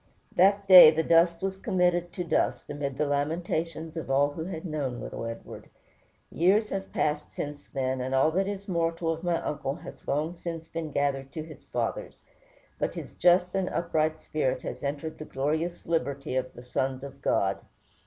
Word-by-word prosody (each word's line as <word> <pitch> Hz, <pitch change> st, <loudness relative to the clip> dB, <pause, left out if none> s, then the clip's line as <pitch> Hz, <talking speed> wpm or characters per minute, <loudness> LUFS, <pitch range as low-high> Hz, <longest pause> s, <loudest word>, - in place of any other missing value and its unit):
That 200 Hz, +2 st, +4 dB
day 185 Hz, -4 st, +12 dB
the 160 Hz, +1 st, +1 dB
dust 170 Hz, +1 st, +4 dB
was 190 Hz, 0 st, -2 dB
committed 180 Hz, -4 st, +1 dB
to 180 Hz, -, -3 dB
dust, 170 Hz, -, 0 dB
amid 140 Hz, -2 st, -4 dB
the 150 Hz, -, +1 dB
lamentations 160 Hz, +2 st, -2 dB
of 165 Hz, -4 st, -5 dB
all 140 Hz, +2 st, +3 dB
who 160 Hz, +2 st, -5 dB
had 170 Hz, -2 st, -6 dB
known 140 Hz, -7 st, -3 dB
little 115 Hz, -, -6 dB
Edward. 115 Hz, -, -8 dB, 0.6 s
Years 205 Hz, +6 st, +3 dB
have 195 Hz, 0 st, -4 dB
passed 150 Hz, 0 st, -1 dB
since 145 Hz, 0 st, -6 dB
then, 130 Hz, -1 st, -2 dB
and 130 Hz, +1 st, -1 dB
all 135 Hz, +4 st, +4 dB
that 190 Hz, +4 st, +1 dB
is 200 Hz, -1 st, -5 dB
mortal 165 Hz, -2 st, 0 dB
of 165 Hz, -, -8 dB
my 175 Hz, -1 st, +1 dB
uncle 140 Hz, -2 st, -2 dB
has -, -, -12 dB
long 150 Hz, +4 st, 0 dB
since 165 Hz, -2 st, -6 dB
been 165 Hz, -1 st, -4 dB
gathered 135 Hz, -1 st, -1 dB
to 155 Hz, -, -4 dB
his 155 Hz, 0 st, -13 dB
fathers; -, -, -4 dB, 0.6 s
but -, -, -1 dB
his -, -, -7 dB
just 180 Hz, 0 st, +3 dB
and 190 Hz, -1 st, 0 dB
upright 155 Hz, -2 st, 0 dB
spirit 130 Hz, -5 st, -1 dB
has -, -, -5 dB
entered 145 Hz, +3 st, -4 dB
the 155 Hz, -, -6 dB
glorious 155 Hz, +6 st, -2 dB
liberty 140 Hz, -5 st, -1 dB
of 130 Hz, 0 st, -1 dB
the 120 Hz, -, -10 dB
sons 130 Hz, +1 st, -2 dB
of 140 Hz, 0 st, -9 dB
God. 95 Hz, -6 st, +1 dB
160 Hz, 185 wpm, -28 LUFS, 140-175 Hz, 0.6 s, day